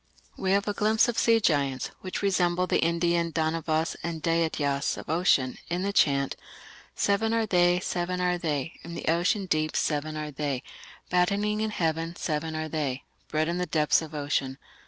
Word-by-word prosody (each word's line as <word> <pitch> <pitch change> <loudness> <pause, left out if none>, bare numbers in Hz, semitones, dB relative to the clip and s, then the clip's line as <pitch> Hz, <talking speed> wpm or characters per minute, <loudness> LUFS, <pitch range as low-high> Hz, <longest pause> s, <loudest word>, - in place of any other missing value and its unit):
We 190 - -2
have 200 +1 +1
a 205 - 0
glimpse 215 +3 +3
of 240 - 0
sea 230 -1 +4
giants, 140 - 0
which 185 +1 -4
resemble 180 -2 +2
the - - +1
Indian 170 0 +1
Danavas 160 0 0
and 170 -1 -4
Daityas 160 -4 0
of - - -6
ocean, 150 -6 +2
in 175 +2 -1
the 200 0 -1
chant: 140 -6 +2 0.6
Seven 220 +3 +1
are 225 -1 +2
they, 175 -3 +3
seven 180 0 -2
are 180 -1 +1
they, 155 -1 -3
In 170 +1 -8
the - - -6
ocean 180 +5 +2
deep 155 -3 0
seven 155 0 -1
are 150 0 -4
they, 140 -2 -3 0.5
Battening 200 +4 +1
in 220 - 0
heaven 165 -3 -1
seven 160 0 -2
are 155 0 -2
they, 145 -4 -2 0.2
Bred 155 +1 0
in 170 +1 -1
the 180 - -1
depths 155 0 +3
of 155 -1 -8
ocean.... 140 -2 -1
165 Hz, 180 wpm, -27 LUFS, 155-180 Hz, 0.6 s, sea